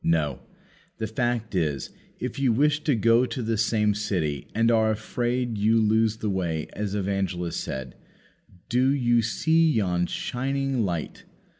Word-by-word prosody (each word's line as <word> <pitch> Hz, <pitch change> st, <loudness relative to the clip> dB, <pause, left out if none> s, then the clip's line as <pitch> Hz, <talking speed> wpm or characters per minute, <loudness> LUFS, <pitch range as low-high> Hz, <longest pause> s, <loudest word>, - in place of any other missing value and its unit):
No; 75 Hz, -5 st, +1 dB, 0.6 s
the 110 Hz, -, -2 dB
fact 115 Hz, 0 st, -2 dB
is, 75 Hz, -8 st, -1 dB, 0.3 s
if -, -, -4 dB
you 135 Hz, -3 st, +3 dB
wish 145 Hz, +5 st, +2 dB
to 145 Hz, -, +3 dB
go 115 Hz, +3 st, +4 dB
to 125 Hz, -, -4 dB
the 115 Hz, 0 st, 0 dB
same 105 Hz, -1 st, +2 dB
city, 90 Hz, -9 st, -2 dB
and 115 Hz, +1 st, +3 dB
are 110 Hz, -1 st, +3 dB
afraid 120 Hz, +1 st, -2 dB
you 110 Hz, +2 st, +3 dB
lose 110 Hz, 0 st, +2 dB
the 110 Hz, -, -2 dB
way; 85 Hz, -5 st, -2 dB
as 105 Hz, -1 st, -3 dB
Evangelist 95 Hz, -3 st, -2 dB
said, 65 Hz, -2 st, -5 dB, 0.7 s
"Do 125 Hz, +2 st, +2 dB
you 120 Hz, -3 st, +3 dB
see 160 Hz, +8 st, +2 dB
yon 90 Hz, -6 st, +1 dB
shining 135 Hz, 0 st, -1 dB
light?" 85 Hz, -5 st, -4 dB
110 Hz, 150 wpm, -25 LUFS, 95-120 Hz, 0.7 s, go